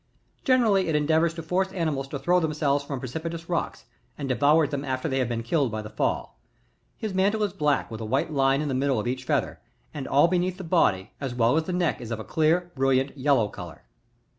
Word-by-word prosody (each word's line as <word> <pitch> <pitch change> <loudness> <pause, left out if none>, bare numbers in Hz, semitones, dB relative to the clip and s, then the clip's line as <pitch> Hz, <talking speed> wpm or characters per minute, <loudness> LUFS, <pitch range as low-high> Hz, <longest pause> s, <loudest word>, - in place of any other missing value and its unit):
Generally 225 -8 +3
it 160 - 0
endeavours 160 +2 +2
to 165 - -6
force 180 +4 0
animds 155 -6 -1
to 140 - -4
throw 180 +5 +2
themselves 150 -3 0
from 140 -2 -5
precipitous 165 +6 -5
rocks, 170 -1 -3 0.3
and 140 - -4
devours 145 +4 +3
them 140 -2 -3
after 130 +1 -2
they 135 -3 0
have 125 -2 0
been 115 -1 -2
killed 135 0 +1
by 110 0 -4
the 105 - -9
fall. 105 - -2 0.6
His 215 -3 -4
mantle 200 +3 +2
is 200 -3 -1
black 150 -9 0
with 110 0 -6
a - - -4
white 140 +8 -1
line 135 +1 +2
in - - -3
the 135 - -1
middle 135 -2 +1
of 105 - -3
each 125 +1 -3
feather, - - -1 0.3
and 145 -4 -5
all 145 +4 +5
beneath 180 +1 0
the 190 - -7
body 105 - +1
as 130 -3 -3
well 120 +2 +3
as 160 0 +1
the 185 - -3
neck 175 -3 0
is 120 - -7
of 115 -2 -3
a - - -5
clear, 170 +5 +1
brilliant, 135 0 +1
yellow 135 -5 +2
colour. 90 -6 -10
145 Hz, 225 wpm, -26 LUFS, 130-170 Hz, 0.6 s, all